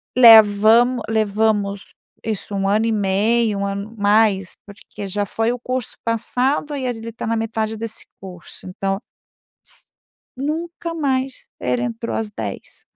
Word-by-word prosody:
Levamo 225 +1 +7
levamos 210 -2 0 0.3
isso, 215 -2 -4
1 195 0 0
ano 215 +2 +2
e 230 - +1
meio, 210 +2 +1
1 200 - -1
ano 200 +3 -5
mais 205 -2 +2
porque 205 0 -9
já 205 +2 -1
foi 225 +4 -1
o 245 - -4
curso 255 0 -3
passado 260 +6 0
e 270 -2 -3
ele 230 -2 -4
tá 230 - -6
na 230 - 0
metade 220 -1 -2
desse 220 0 -6 0.2
curso, 180 -3 -11
então 195 +1 -2 0.7
S - - -12 0.5
nunca 330 +4 -4
mais 270 -4 -2
ele 125 -1 -1
entrou 115 -1 -3
às 110 -1 -3
10h. 105 -3 -7
220 Hz, 145 wpm, -20 LUFS, 200-235 Hz, 0.7 s, Levamo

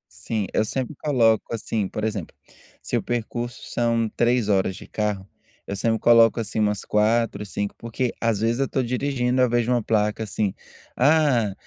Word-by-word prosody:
Sim, 110 -3 -3
eu - - +2
sempre 130 +6 -3
coloco 115 -7 +2
assim, 105 -2 -2
por 105 - -5
exemplo, 105 -6 -3 0.5
se - - -3
o - - +1
percurso 120 0 -4
são 115 -1 +1
3 120 -2 +2
horas 95 -2 +1
de - - -10
carro, 105 -3 -2 0.4
eu 100 - -4
sempre 110 +3 +1
coloco, 115 -1 +5
assim, 110 0 -4
umas 105 -1 0
4, 105 0 +1
5 100 0 -3
porque, 115 +1 -3
às 115 -3 +1
vezes, 115 +2 +1
eu 135 - +2
estou 130 0 -1
dirigindo 125 0 0
ao 125 - +4
vejo 120 0 +1
uma 120 -1 +2
placa 105 0 0
assim: 105 -2 -2 0.4
"Ah, 135 -7 +3
115 Hz, 175 wpm, -23 LUFS, 105-120 Hz, 0.5 s, coloco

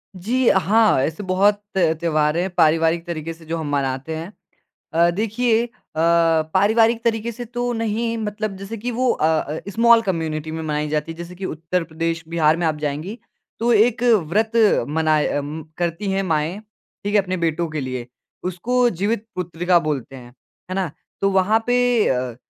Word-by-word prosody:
जी। 235 +7 0
अ, - - +4
हाँ। 215 -3 +3
ऐसे 160 +7 -3
बहुत 200 +2 +2 0.2
त्योहार 160 -2 +1
हैं 185 +2 0
पारिवारिक 165 +1 +3
तरीके 165 -1 -4
से 165 0 -17
जो 165 +1 -3
हम 155 -2 -4
मनाते 140 +2 -2
हैं। 165 +5 -6 0.6
अ, 170 +1 +4
देखिए 225 +4 0 0.3
अ, 155 - -3 0.5
पारिवारिक 225 +4 +3
तरीके 230 0 0
से 240 +2 -7
तो 245 +1 -3
नहीं 230 +1 -1
मतलब 215 -1 -3
जैसे 195 +4 -7
कि 245 +4 -3
वो 250 +1 +1
अ - - 0
अ, 155 -1 0
स्मॉल 230 +2 +5
कम्युनिटी 160 -6 -3
में 160 0 -4
मनाई 150 -1 -2
जाती 150 +1 -2
है 165 - -10
जैसे 170 +1 -8
की 190 +1 -6
उत्तर 165 +2 -2
प्रदेश, 165 0 -3
बिहार 160 -1 +2
में 170 - -1
आप 155 - 0
जाएँगी, 155 +8 -4 0.4
तो 240 +1 +2
एक 230 +2 +3 0.2
व्रत 220 +5 +1 0.4
मना 155 0 +2 0.2
अम, 150 +2 -5
करती 175 +3 -2
हैं 195 0 0
माएँ, 165 +2 -1 0.4
ठीक 205 +1 -2
है? 205 - +6
अपने 185 -1 -3
बेटों 170 0 0
के 155 0 -3
लिए, 130 -2 -5 0.4
उसको 240 +8 +1
जीवित 205 +3 -2
पुत्रिका 175 0 +1
बोलते 145 -4 -3
हैं, 120 -2 -11 0.4
है 185 - -3
ना? 190 -5 -1 0.3
तो 195 - +3
वहाँ 195 +4 +3
पे 245 -2 +3
अ, 125 -2 -1
175 Hz, 180 wpm, -21 LUFS, 160-220 Hz, 0.6 s, है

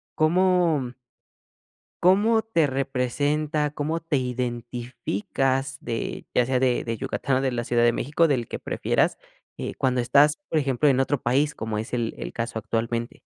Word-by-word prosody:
¿cómo? 165 -5 +2 1.1
¿cómo 210 +5 +4
te 170 -10 +1
representa? 145 +3 0
¿Cómo 150 +3 -2
te 165 -3 -1
identificas 125 +1 -2
de 115 -1 -4
ya 125 - +3
sea 130 0 +1
de 125 -2 +1
de 115 -1 -2
Yucatán 135 +4 -1
o - - 0
de 135 -1 +1
la 120 -1 -2
Ciudad 120 0 +1
de 120 0 +5
México, 150 +7 +1
del 125 -5 0
que - - -6
prefieras, - - 0 0.4
eh, - - -5
cuando 130 -1 +1
estás 140 +5 +4
por 160 - +1
ejemplo 135 +1 +2
en 135 -2 +3
otro 135 0 0
país 140 +5 +1
como 110 -1 -3
es 110 +2 -4
el 120 -2 -1
el - - -6
caso 115 0 -4
actualmente? 115 +2 -3
130 Hz, 160 wpm, -25 LUFS, 120-150 Hz, 1.1 s, de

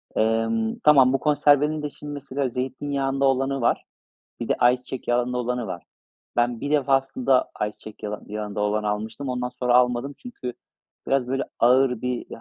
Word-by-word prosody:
emm 115 0 +1
Tamam, 135 -4 +6
bu 135 - +2
konservenin 150 +1 +3
de, 150 - -3
şimdi, 145 +1 -9
mesela 140 -1 -3
zeytinyağında 135 +2 -1
olanı 135 0 +1
var, 120 - +1 0.6
bir 120 - -4
de - - +3
ayçiçek 125 +1 +1
yağında 125 +1 +1
olanı 125 -1 -2
var. 85 - -6 0.5
Ben 120 -1 +1
bir 145 - -3
defasında 135 -2 +2
ayçiçek 105 0 -6
yala 105 0 -4
yağında 105 -1 -4
olanı 105 +1 0
almıştım, 110 +6 -3
ondan 125 -1 -2
sonra 125 -1 0
almadım 125 +2 +2
çünkü 175 - -7 0.5
biraz, 135 -2 +1
böyle, 135 +1 0 0.2
ağır 125 0 +4
bir 125 -1 -2
125 Hz, 155 wpm, -24 LUFS, 115-135 Hz, 0.6 s, Tamam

